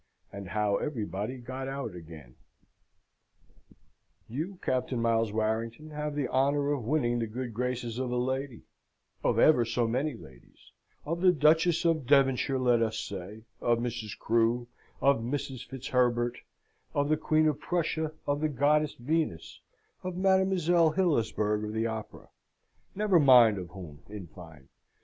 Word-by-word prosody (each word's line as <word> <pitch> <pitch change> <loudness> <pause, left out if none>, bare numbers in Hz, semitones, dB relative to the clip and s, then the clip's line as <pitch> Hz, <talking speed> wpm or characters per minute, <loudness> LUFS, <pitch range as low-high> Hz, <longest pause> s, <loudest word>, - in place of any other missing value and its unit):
And 100 -2 -7
how 105 0 +1
everybody 110 - -4
got 130 +2 -6
out 135 -6 -4
again 80 -7 -11 1.9
You, 160 - -5
Captain 130 -1 -1
Miles 115 -1 +1
Warrington, 115 +7 -2
have 150 0 -4
the 145 -3 -1
honour 140 +3 +1
of 135 -6 -2
winning 120 -3 +1
the 115 - -1
good 120 +2 -5
graces 125 0 -3
of 130 -1 -2
a 125 - -2
lady 130 0 -2 0.6
of - - +1
ever 150 -6 +5
so 115 +1 0
many 130 +5 -1
ladies 65 - -17 0.3
of 165 +3 -3
the 185 -1 +6
Duchess 160 +2 +3
of 160 -6 +1
Devonshire, 135 -1 +3
let 125 -2 +3
us 110 -1 0
say, 100 +3 -7 0.2
of 120 -1 +2
Mrs. 115 -3 -4
Crew, 115 +1 +1 0.3
of 140 -3 +4
Mrs. 130 +1 -4
Fitzherbert, 125 -2 0 0.6
of 145 0 +1
the 155 - +3
Queen 155 0 +2
of 150 - 0
Prussia, 160 -3 -1
of 145 +1 -1
the 155 - +1
Goddess 150 +2 +2
Venus, 145 - -2 0.4
of 185 -1 -5
Mademoiselle 185 -4 +3
Hillisberg 110 - +1
of 105 0 -4
the 110 +1 -1
Opera 110 -1 -6 0.7
never 200 -3 +3
mind 120 -8 +6
of 90 -2 -7
whom, 85 -7 -10
in 105 -3 -7
fine. 80 -5 -14
125 Hz, 145 wpm, -29 LUFS, 110-150 Hz, 1.9 s, the